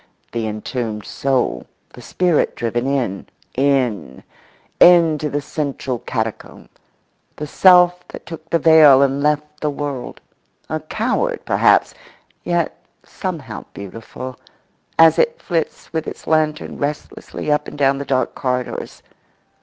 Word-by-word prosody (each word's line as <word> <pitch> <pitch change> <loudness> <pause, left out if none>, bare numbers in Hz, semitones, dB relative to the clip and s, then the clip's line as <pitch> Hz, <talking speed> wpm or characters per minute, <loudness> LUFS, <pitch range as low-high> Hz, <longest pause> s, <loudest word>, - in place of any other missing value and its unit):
—the 115 -2 -2
entombed 110 0 -4
soul, 135 -2 -1 0.3
the - - -12
spirit 180 -4 +1
driven 120 +2 -2
in, 125 -9 -2 0.3
in, 125 - 0 0.6
in 170 -3 +7
to 150 - -2
the 145 0 -3
central 135 -5 -3
catacomb; 110 -2 -5 0.7
the 150 - -5
self 180 +2 +5
that - - -10
took 165 -1 -10
the 170 - +3
veil 155 -4 +7
and 140 +1 0
left 150 0 -1
the 150 - -1
world—a 140 -3 -7
coward - - -1
perhaps, - - +3 0.5
yet 175 -2 -1 0.3
somehow - - -6
beautiful, 115 +5 -8 0.6
as 165 -1 +6
it 475 +1 +2
flits 165 -3 -3
with 160 -1 -2
its - - -8
lantern 155 -1 0
restlessly 150 +1 -4
up 150 - +1
and - - -9
down 135 -1 +2
the - - -3
dark 130 -3 0
corridors. 125 -1 -4
140 Hz, 125 wpm, -19 LUFS, 125-160 Hz, 0.7 s, in